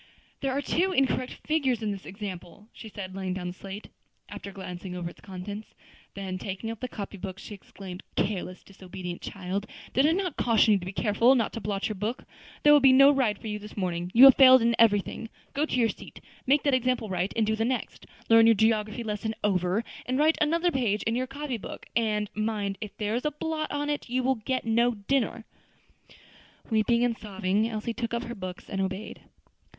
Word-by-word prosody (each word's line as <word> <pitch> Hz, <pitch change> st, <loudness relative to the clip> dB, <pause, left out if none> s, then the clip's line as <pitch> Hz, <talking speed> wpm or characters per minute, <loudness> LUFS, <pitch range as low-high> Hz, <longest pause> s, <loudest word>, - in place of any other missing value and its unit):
"There 270 Hz, -1 st, -1 dB
are 280 Hz, +2 st, -1 dB
two 370 Hz, +6 st, +1 dB
incorrect 265 Hz, -5 st, 0 dB
figures 265 Hz, -7 st, +1 dB
in 210 Hz, -, 0 dB
this 195 Hz, -2 st, -7 dB
example," 195 Hz, 0 st, -8 dB
said 220 Hz, -3 st, -11 dB
she, 185 Hz, -2 st, -6 dB
laying 190 Hz, -1 st, -3 dB
down 180 Hz, -2 st, -4 dB
the -, -, -6 dB
slate, 195 Hz, +3 st, -9 dB, 0.4 s
after 200 Hz, -, -8 dB
glancing 180 Hz, -1 st, -7 dB
over 175 Hz, -1 st, -4 dB
its -, -, -19 dB
contents. 200 Hz, +2 st, -8 dB, 0.4 s
Then 190 Hz, -2 st, -4 dB
taking 195 Hz, +4 st, -5 dB
up 225 Hz, -, -8 dB
the 255 Hz, -, -3 dB
copy 205 Hz, -3 st, -7 dB
book, 190 Hz, 0 st, -6 dB
she 210 Hz, -, -9 dB
exclaimed, 195 Hz, -1 st, -10 dB
"Careless, 185 Hz, -2 st, -2 dB
disobedient 185 Hz, -2 st, -8 dB
child! 195 Hz, +1 st, -4 dB, 0.3 s
did 270 Hz, +3 st, +4 dB
I 320 Hz, -, +3 dB
not 365 Hz, -4 st, -2 dB
caution 230 Hz, -2 st, +4 dB
you 200 Hz, -, +3 dB
to 180 Hz, -, -8 dB
be -, -, -3 dB
careful 230 Hz, +5 st, +3 dB
not 235 Hz, -4 st, 0 dB
to 230 Hz, -, -5 dB
blot 200 Hz, -1 st, -2 dB
your 215 Hz, -, -3 dB
book! 215 Hz, +5 st, -3 dB, 0.4 s
There 295 Hz, -, +8 dB
will 295 Hz, -, +8 dB
be 270 Hz, -1 st, +6 dB
no 275 Hz, +2 st, +8 dB
ride 250 Hz, -7 st, +1 dB
for -, -, -15 dB
you 210 Hz, -1 st, -3 dB
this 210 Hz, +1 st, -11 dB
morning. 175 Hz, -2 st, -2 dB
You 245 Hz, -, +9 dB
have 270 Hz, -1 st, +11 dB
failed 260 Hz, -2 st, +8 dB
in 235 Hz, 0 st, +3 dB
everything. 225 Hz, 0 st, +2 dB, 0.2 s
Go 295 Hz, +3 st, 0 dB
to -, -, -2 dB
your 230 Hz, -, +4 dB
seat. -, -, -9 dB, 0.3 s
Make 285 Hz, +2 st, +4 dB
that 285 Hz, -, +2 dB
example 250 Hz, -2 st, +1 dB
right, 185 Hz, 0 st, -1 dB
and 225 Hz, -, +2 dB
do 220 Hz, +1 st, +1 dB
the 220 Hz, -, -1 dB
next; 250 Hz, +2 st, -3 dB, 0.2 s
learn 225 Hz, 0 st, +7 dB
your 230 Hz, -, +6 dB
geography 215 Hz, +1 st, +1 dB
lesson 220 Hz, 0 st, -3 dB
over, 190 Hz, +1 st, +1 dB, 0.2 s
and 255 Hz, +1 st, 0 dB
write 310 Hz, +2 st, +3 dB
another 335 Hz, +3 st, +2 dB
page 230 Hz, -7 st, 0 dB
in 225 Hz, -, 0 dB
your 255 Hz, +1 st, -1 dB
copy 275 Hz, -1 st, -4 dB
book; -, -, -9 dB
and, 215 Hz, -2 st, +1 dB
mind, 210 Hz, -2 st, -2 dB
if 210 Hz, -2 st, -7 dB
there 210 Hz, 0 st, -2 dB
is 240 Hz, -, -1 dB
a 300 Hz, -, +1 dB
blot 310 Hz, +1 st, -3 dB
on 290 Hz, 0 st, -2 dB
it, 295 Hz, -4 st, -3 dB
you 255 Hz, +1 st, 0 dB
will 265 Hz, +1 st, +3 dB
get 255 Hz, +2 st, -3 dB
no 235 Hz, +1 st, +2 dB
dinner." 230 Hz, +1 st, -1 dB, 1.3 s
Weeping 235 Hz, +2 st, +3 dB
and 240 Hz, -1 st, +1 dB
sobbing, 210 Hz, 0 st, -1 dB
Elsie 220 Hz, +1 st, -3 dB
took 235 Hz, -1 st, -3 dB
up 235 Hz, -, -2 dB
her 240 Hz, -, -6 dB
books 185 Hz, -4 st, -7 dB
and 195 Hz, -, -3 dB
obeyed. 190 Hz, +2 st, -4 dB
220 Hz, 215 wpm, -27 LUFS, 195-255 Hz, 1.3 s, have